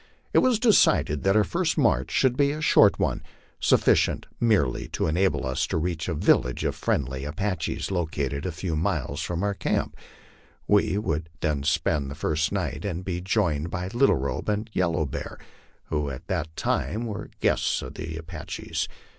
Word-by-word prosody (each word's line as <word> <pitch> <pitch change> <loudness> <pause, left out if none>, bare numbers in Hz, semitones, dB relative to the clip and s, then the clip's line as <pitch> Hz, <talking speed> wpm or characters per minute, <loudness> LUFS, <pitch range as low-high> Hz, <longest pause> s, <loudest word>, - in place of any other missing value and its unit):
It - - +6
was 255 -3 +3
decided 210 - +4
that 95 +1 +2
our 110 - +5
first - - -1
march - - +2
should 130 -2 +2
be 140 +1 +3
a 150 +2 -3
short 155 - +5
one, - - 0 0.4
suffi - - +5
cient - - 0
merely 100 - +2
to - - -2
enable 90 +2 +1
us 65 0 -1
to - - -1
reach 80 -1 -2
a 85 - -1
village 65 -3 +2
of - - 0
friendly 65 -1 -1
Apaches, 95 +5 -2
located 75 -6 -2
a 90 - -2
few 85 0 -3
miles 75 - -1
from 90 +1 -2
our 100 0 +1
camp, - - -1 0.7
where 105 -1 +4
we 95 - -1
would 80 -6 -2 0.4
spend 75 -2 +1
the 70 - -6
first 80 +1 0
night 90 -7 -2
and 90 -3 -4
be 90 -2 -3
joined 90 -5 0
by 90 +1 -3
Little 120 +6 +3
Robe 70 +9 -3
and 105 +2 -2
Yellow 85 -3 +1
Bear, 65 - -6 0.5
who 75 -2 -1
at 65 +4 -7
that 80 -4 -3
time 115 +3 -1
were 110 -3 -5
guests - - +1
of - - -7
the 80 -1 -6
Apaches. 80 0 -5
85 Hz, 180 wpm, -26 LUFS, 75-100 Hz, 0.7 s, It